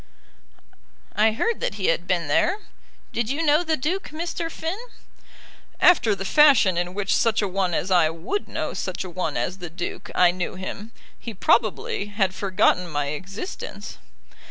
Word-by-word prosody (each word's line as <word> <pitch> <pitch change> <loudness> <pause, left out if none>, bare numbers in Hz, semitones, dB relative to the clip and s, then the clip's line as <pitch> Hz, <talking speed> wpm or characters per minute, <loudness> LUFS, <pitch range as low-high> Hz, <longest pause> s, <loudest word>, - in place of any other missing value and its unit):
"I 215 +2 +4
heard 455 - -1
that - - -2
he 195 -3 -3
had 175 +2 0
been 175 -4 0
there. 360 - +2 0.5
Did 235 -1 -1
you 290 +5 -1
know 300 +3 +4
the 320 -2 0
Duke, 350 +9 -2
Mr. 330 +1 -4
Finn?" 330 +5 -4 1.0
"After 245 - +5
the 195 0 -6
fashion 270 - +5
in 175 +1 -2
which 205 -1 0
such 230 -1 +2
a - - +1
one 185 -2 -1
as 190 - -2
I 175 -4 +5
would 165 - -4
know - - -3
such - - -4
a 185 - -8
one 180 +1 -2
as 185 +1 -2
the 175 -2 -6
Duke, 175 +2 -6
I 180 -1 +5
knew 180 +1 -4
him. 200 +4 -7 0.3
He 230 - -7
probably 215 -1 +1
had 200 -2 0
forgotten 185 -2 +1
my 145 -2 -1
existence." 195 - -7
200 Hz, 170 wpm, -24 LUFS, 180-280 Hz, 1.0 s, After